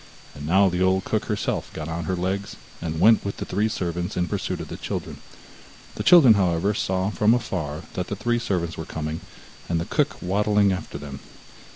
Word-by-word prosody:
And 75 0 -7
now 95 +4 +5
the 90 0 -1
old 95 +1 +3
cook - - -1
herself - - -2
got 75 -1 -5
on 80 0 -4
her 95 - -1
legs, 95 +3 -2 0.3
and 80 -1 -3
went 110 +3 +6
with 100 - -4
the - - -4
three 105 +4 0
servants 90 -1 -3
in 90 -1 +1
pursuit - - -3
of - - -6
the - - -5
children. - - -5 0.8
The - - -5
children, 165 -10 +8
however, 95 0 +1
saw 95 0 0
from 110 +2 +3
afar 80 -10 -3
that 90 - -3
the 100 - -3
three 120 +3 0
servants 90 -8 -2
were 80 - -4
coming, 80 0 -4 0.5
and 85 -1 +1
the 85 - -2
cook - - 0
waddling 105 +2 +2
after 85 -5 -5
them. 70 -1 -8
95 Hz, 200 wpm, -24 LUFS, 85-100 Hz, 0.8 s, children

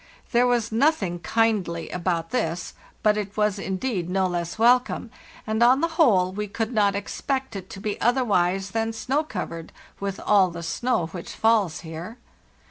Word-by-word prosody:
There 245 0 +4
was 235 -2 +1
nothing 220 - +1
kindly 190 -3 0
about 170 -1 -2
this, 175 -8 -2 0.3
but 210 0 +4
it 205 0 -4
was 210 -2 +1
indeed 190 -1 -2
no 190 +1 +1
less 175 0 -3
welcome; 240 0 +3 0.3
and 220 +1 -1
on 255 +4 +5
the 335 - +1
whole 225 - +3
we 210 +2 -4
could 225 +4 -3
not 205 -2 +3
expect 265 +4 -3
it 190 -1 -7
to 195 - -8
be 210 0 -4
otherwise 195 -6 +2
than 225 0 -1
snow 265 +7 0
covered, 165 - -6 0.3
with 195 -1 -3
all 195 -3 +4
the 170 0 -7
snow 180 +3 0
which 170 +1 -8
falls 220 -7 +2
here. 165 +7 -8
210 Hz, 165 wpm, -24 LUFS, 180-235 Hz, 0.3 s, on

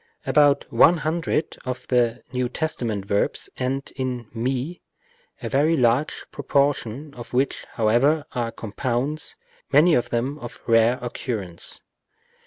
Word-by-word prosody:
About 145 -2 +4
one 175 - +6
hundred 160 0 -1
of 125 0 -5
the 120 -1 +2
N. 125 -1 0
T. 120 -8 -2
verbs 100 0 0
end 135 +2 -2
in 125 -3 -3
ju, 130 +8 -2 0.7
a - - -2
very 155 +4 +3
large 125 +4 +1
proportion 140 -1 0
of 120 -2 -10
which, 130 +2 0
however, 125 +8 +3
are 120 -2 -2
compounds, 125 +7 -3 0.4
many 155 +5 +6
of 120 - +2
them 130 +5 -1
of 120 -4 -9
rare 115 +1 +4
occurrence. 110 -8 -3
125 Hz, 125 wpm, -24 LUFS, 120-145 Hz, 0.7 s, one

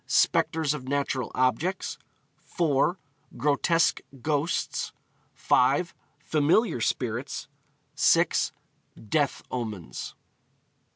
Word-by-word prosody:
Spectres 160 -2 +2
of 135 -4 -7
Natural 135 -3 -1
Objects; 150 +9 0 0.4
4. 165 +1 +1 0.4
Grotesque 150 +5 +2 0.2
Ghosts; 150 +3 -1 0.4
5. 140 +8 +2 0.2
Familiar 155 - +2
Spirits; 120 +2 -2 0.5
6. - - +3 0.6
Death 145 +1 +1
Omens. 110 -8 -5
145 Hz, 70 wpm, -27 LUFS, 130-160 Hz, 0.6 s, 6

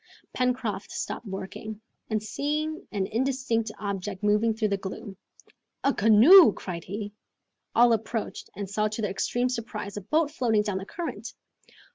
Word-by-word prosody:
Pencroft 250 -6 -1
stopped 240 - -5
working, 195 +2 -6 0.3
and 215 -1 -1
seeing 305 - -2
an 200 -3 -1
indistinct 235 -1 0
object 200 -1 -4
moving 210 +2 +3
through 220 -1 0
the 200 - +1
gloom, 195 +1 -7 0.7
"A 275 - +3
canoe!" 225 - +8
cried 170 -3 -6
he. 205 +1 -5 0.6
All 240 0 +6
approached, 225 0 -3
and 200 -1 -4
saw 210 +2 0
to 215 +1 -4
their 205 - 0
extreme 245 +6 0
surprise, 225 -4 -5
a - - -3
boat 300 - +1
floating 230 -8 +1
down 205 -3 -2
the 195 - -8
current. 255 - -5
215 Hz, 150 wpm, -27 LUFS, 200-250 Hz, 0.7 s, canoe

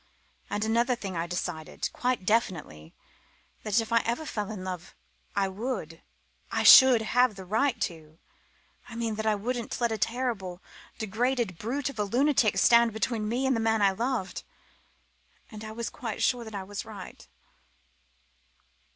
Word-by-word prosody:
And 210 +1 -1
another 235 +3 +2
thing 195 -5 -6
I 165 +1 -2
decided 175 -3 -4
quite 250 -6 -1
definitely 160 - -1 0.7
that 215 +1 +1
if 225 0 -3
ever 230 +5 +1
I - - -10
fell 210 -8 -4
in 205 -4 -6
love 180 -2 -6 0.4
I 200 -1 +2
would 190 -5 -5 0.5
I - - 0
should 255 -4 +9
have 245 0 +2
the 190 -1 -9
right 225 +8 +1
to 160 -3 -5 0.7
I 230 - -9
mean 230 -1 -2
that 220 +1 -3
I 215 - +3
wouldn't 235 +3 -3
let 235 -1 +1
a 220 0 0
horrible, 225 -8 -3 0.4
degraded 225 -2 -1
brute 255 +5 -2
of 235 - -13
a - - +2
lunatic 245 +1 +2
stand 235 -1 +5
between 220 -1 -1
me 250 +4 0
and 265 -1 +2
the - - 0
man 225 -1 +2
I 195 - +5
loved. 230 -1 -2 1.1
And 215 -1 -9
I 215 - -7
was 230 +1 -4
quite 225 -4 -4
sure 245 -2 +1
that 220 -1 -8
I 195 - -4
was 205 +1 -6
right." 205 -4 -10
220 Hz, 165 wpm, -28 LUFS, 195-240 Hz, 1.1 s, should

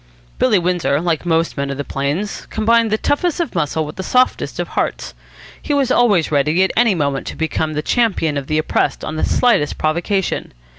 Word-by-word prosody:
Billy 235 -5 +4
Windsor, 175 -6 0
like 170 0 -1
most 165 0 +1
men 140 0 -2
of 140 - -4
the 145 - -3
plains, 145 +10 -3
combined 230 +1 +2
the 215 - +1
toughest 330 +8 0
of 340 - -2
muscle 160 -2 -1
with 150 - -9
the - - -3
softest 255 +6 +1
of - - -2
hearts. - - -3 0.5
He 290 - -1
was 270 -3 +1
always 205 -12 +3
ready 150 +5 +2
at 190 - +1
any 230 -4 +3
moment 140 -4 -1
to - - -5
become 160 0 -2
the 150 0 -2
champion 205 -11 +1
of 140 -1 -4
the 155 - 0
oppressed 155 - 0
on 155 - -4
the 155 - -2
slightest 235 -12 +2
provocation. 170 +5 -1
170 Hz, 200 wpm, -18 LUFS, 150-220 Hz, 0.5 s, Billy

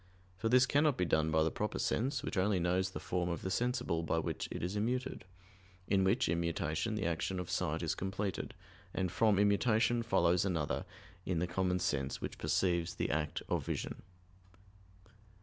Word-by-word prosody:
For 115 +5 -1
this 125 +1 +6
cannot 145 0 +3
be 90 - +1
done 80 -1 +2
by 80 0 +3
the 80 - +1
proper 105 - -2
sense, 130 +3 0
which - - -3
only 95 0 +2
knows 90 +2 +1
the - - -6
form 90 -1 -1
of 85 -2 -3
the 95 - -2
sensible 120 -7 0
by 80 - 0
which - - -2
it - - -5
is 90 +3 -2
immuted, 115 -1 -2 0.6
in 95 -1 +3
which 95 - +2
immutation 85 +5 -1
the 105 -1 -2
action 85 +3 -1
of 90 - -5
sight 85 -1 -1
is 80 - 0
completed, 95 +1 -3 0.4
and 95 -2 0
from 105 +2 +3
immutation 110 +3 +3
follows 90 -6 +3
another 85 -7 -1 0.4
in 90 -2 -1
the 85 - +1
common 90 +1 0
sense 70 -7 -1
which - - -6
perceives 85 -2 +1
the - - -1
act 75 0 -1
of - - 0
vision. - - -4
90 Hz, 180 wpm, -34 LUFS, 85-105 Hz, 0.6 s, this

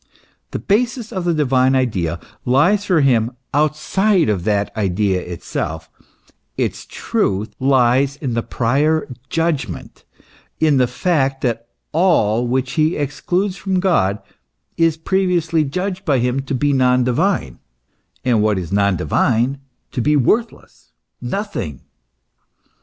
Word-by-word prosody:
The - - -4
basis 235 +2 0
of 185 -3 -3
the 175 - +2
divine 130 -3 +2
idea 95 -10 0 0.2
lies 180 +12 +3
for 180 -6 +3
him 120 -3 +2 0.2
outside 155 - +2
of 95 -4 -1
that 105 0 0
idea 95 -2 0
itself; 90 -1 -5 0.7
its - - -2
truth 105 +3 -1
lies 130 +1 +3
in 135 -4 -4
the 115 - 0
prior 145 +8 0 0.2
judgment, 155 - -2 0.6
in 155 -3 +3
the 125 -1 +3
fact 135 -5 0
that 115 -2 -2 0.2
all 125 - +2
which 130 +1 -1
he 155 +2 +1
excludes 180 +7 -1
from 190 -2 -1
God 155 - +2 0.6
is 165 -1 +2
previously 170 -2 +1
judged 185 +6 -3
by 145 -6 +2
him 125 +2 0
to 135 - -1
be 145 +2 +1
non 125 -1 +3
divine, 130 - 0 0.7
and 120 -4 +3
what 105 -2 +2
is 90 -2 -5
non 100 -1 +2
divine 120 - +1 0.3
to 125 - -2
be 150 +6 +2
worthless, 220 - -1 0.3
nothing. 125 - -4
135 Hz, 130 wpm, -19 LUFS, 115-170 Hz, 0.7 s, lies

